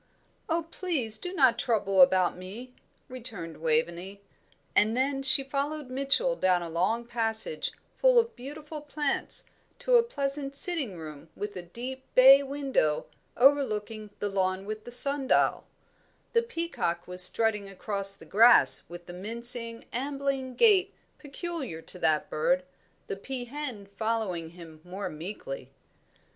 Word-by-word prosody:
"Oh, 330 +1 0
please 265 - -2
do 360 - -6
not 260 -10 +3
trouble 195 -5 +1
about 180 0 +4
me!" 205 +8 -10 0.3
returned 215 -11 -7
Waveney; 170 +5 -2 0.6
and 220 +3 +3
then 270 +1 0
she 270 0 +6
followed 280 0 -4
Mitchell 275 - 0
down 180 - +1
a 170 - -7
long 205 +8 -1
passage, 230 - -2 0.3
full - - +4
of 465 0 +2
beautiful 295 +4 -9
plants, 295 -1 -1 0.3
to - - +3
a - - +6
pleasant 280 - -4
sitting 285 - -1
room 155 -1 -10
with 205 0 -6
a 180 - -5
deep 250 +9 -8
bay 270 +2 +8
window 270 - -1 0.3
overlooking 225 -5 +1
the 205 - -2
lawn 190 -1 -1
with 215 +1 -6
the 240 - -9
sundial; 275 +2 +2 0.7
the 465 - +4
peacock 335 - -4
was 180 0 0
strutting 210 +1 +3
across 195 0 +2
the - - -14
grass 230 +4 +6
with 175 0 -10
the 175 - -10
mincing, 230 +4 +1
ambling 270 0 -3
gait 400 - +3 0.2
peculiar 290 - -6
to 180 +2 +1
that 155 -2 +1
bird, 175 +4 0 0.4
the - - -5
peahen 250 0 -6
following 200 -5 -3
him 165 -2 -14
more 185 +3 -6
meekly. 210 - -8
235 Hz, 135 wpm, -28 LUFS, 185-280 Hz, 0.7 s, bay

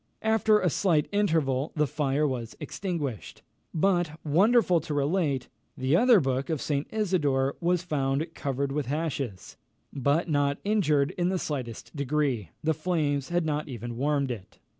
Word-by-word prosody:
After 220 -1 +4
a 185 - +1
slight 160 -5 +2
interval, 160 -9 +1
the 150 -1 +2
fire 150 0 0
was 120 -4 -4
extinguished; 150 - -4 0.3
but, 175 -2 +1
wonderful 180 +4 +4
to 150 -1 -5
relate! 145 -3 0 0.3
the 130 +4 +2
other 240 +2 +6
book 135 -1 -1
of 160 -3 0
St. 145 +1 -1
Isidore 150 -11 +1
was 175 0 +1
found 140 -3 0
covered 140 -1 -2
with 140 -3 -2
ashes, 140 - -3 0.4
but 140 +5 +1
not 145 -2 +1
injured 155 -10 +2
in 175 +1 +2
the 190 - 0
slightest 130 -5 -5
degree. 140 - 0
The 160 +1 +2
flames 150 -4 -1
had 175 -1 +1
not 150 0 -1
even 120 -1 -6
warmed 140 +1 0
it. 105 -6 -8
150 Hz, 150 wpm, -27 LUFS, 135-175 Hz, 0.4 s, other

